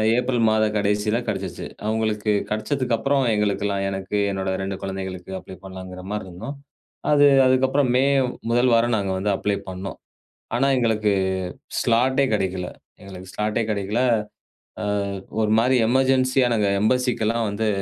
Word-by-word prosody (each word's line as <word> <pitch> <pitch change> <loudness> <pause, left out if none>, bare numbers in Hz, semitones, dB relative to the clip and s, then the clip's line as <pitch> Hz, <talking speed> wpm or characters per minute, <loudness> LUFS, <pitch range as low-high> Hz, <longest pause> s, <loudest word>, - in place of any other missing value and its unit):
April 125 0 0
மாத 110 0 +3
கடைசியில 105 +2 +1
கிடைச்சுச்சு. 95 -4 -4 0.2
அவங்களுக்கு 110 -1 0 0.2
கிடைச்சதுக்கு 120 +3 -1
அப்புறம் 135 +4 +1
எங்களுக்கெல்லாம் 100 -1 0
எனக்கு 95 +1 -4 0.2
என்னோட 95 0 -2
2 95 0 -3
குழந்தைகளுக்கு 95 -1 -5
அப்ளை 95 - -11
பண்ணலாங்குற 95 -1 -8
மாரி 105 -2 -3
இருந்தோம். 110 +11 -7 0.6
அது 145 -1 +6 0.2
அதுக்கப்புறம் 130 +1 +3
மே 130 - +4 0.5
முதல் 120 +1 +3
வாரம் 115 +1 +3
நாங்க 100 -2 -1
வந்து 100 +2 0
அப்ளை 100 +1 -1
பண்ணோம். 95 +1 -6 0.6
ஆனா 135 +3 +2
எங்களுக்கு 110 -3 +1 0.7
ஸ்லாட்டே 130 +4 +3
கிடைக்கல்ல. 95 -3 -1 0.3
எங்களுக்கு 95 -1 -10
ஸ்லாட்டே 105 +2 -1
கிடைக்கலை. 105 +5 0 0.8
ஆ - - -2 0.6
ஒரு 105 0 +1
மாரி 125 +3 +3
எமர்ஜென்சி 130 +1 +2 0.2
நாங்க 105 -2 +2
எம்பஸிக்லாம் 115 -1 +1
வந்து 105 +2 -1
110 Hz, 130 wpm, -23 LUFS, 95-125 Hz, 0.8 s, அது